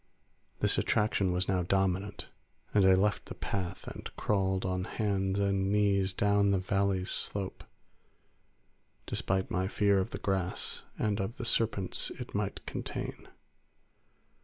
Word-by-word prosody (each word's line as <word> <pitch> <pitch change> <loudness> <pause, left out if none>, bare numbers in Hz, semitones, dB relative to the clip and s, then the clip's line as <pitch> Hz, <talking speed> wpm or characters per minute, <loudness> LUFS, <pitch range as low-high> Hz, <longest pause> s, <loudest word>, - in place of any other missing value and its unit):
This - - +3
attraction 100 -3 +2
was 90 +1 0
now 95 -1 +2
dominant, 95 +2 0 0.4
and 100 -2 +5
I 95 - +7
left 100 +2 +1
the - - -7
path 90 -3 -4
and - - -6
crawled 95 -2 0
on 90 0 -1
hands 95 -3 0
and 100 -1 +1
knees 100 -2 +3
down 100 +1 +3
the 100 - +3
valley's 95 0 0
slope 100 -2 -3 1.4
despite 95 0 -1
my 95 +1 0
fear 100 -1 +3
of 95 - -1
the - - -5
grass 95 -2 -2
and 105 -1 0
of 100 +6 -3
the 120 - -4
serpents 110 -5 +2
it - - -7
might - - -2
contain. - - -5
95 Hz, 135 wpm, -31 LUFS, 95-100 Hz, 1.4 s, I